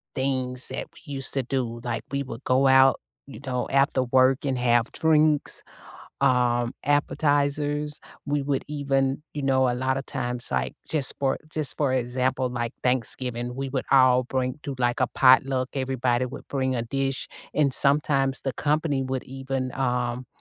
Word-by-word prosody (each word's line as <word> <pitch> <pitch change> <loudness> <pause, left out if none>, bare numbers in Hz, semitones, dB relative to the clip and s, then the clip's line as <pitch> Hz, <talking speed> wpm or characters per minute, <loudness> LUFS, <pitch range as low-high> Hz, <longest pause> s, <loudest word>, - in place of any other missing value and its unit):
things 130 -2 +1
that 130 - -5
we 145 -3 -11
used 135 -1 -1
to 135 - 0
do. 120 -2 -3
Like, 120 - -3
we 140 0 -1
would 125 -1 -9
go 130 +2 +3
out, 130 0 +5 0.3
you 135 -6 -11
know, 125 -2 -2
after 135 -1 +2
work 130 +2 +3
and 135 -2 0
have 120 0 +2
drinks, 155 -2 +2 0.6
um, 120 -1 +2
appetizers. 145 0 0 0.3
We 145 0 0
would 140 -1 -1
even, 140 -1 0
you 145 - -5
know, 130 -1 +2
a 120 - 0
lotta 130 +2 -1
times, 125 -2 -4
like, 65 0 -1
just 150 -4 +4
for 135 -1 +1
just 155 -2 +1
for 140 -3 +1
example, 130 +1 0
like, 120 -1 -3
Thanksgiving, 125 -1 -1
we 135 0 -3
would 130 -1 -3
all 130 -2 +5
bring 130 +2 -2
do, 140 - -5
like, 120 0 0
a 130 - +3
potluck, 130 0 +4
everybody 130 -2 0
would 130 +3 -9
bring 130 -2 -1
a 115 - -1
dish, 135 +3 -2 0.2
and 145 -3 +2
sometimes 140 -1 +2
the 135 - -2
company 150 0 0
would 130 -1 -3
even, 135 -1 -4
um, 125 -1 -1
130 Hz, 165 wpm, -25 LUFS, 125-140 Hz, 0.6 s, out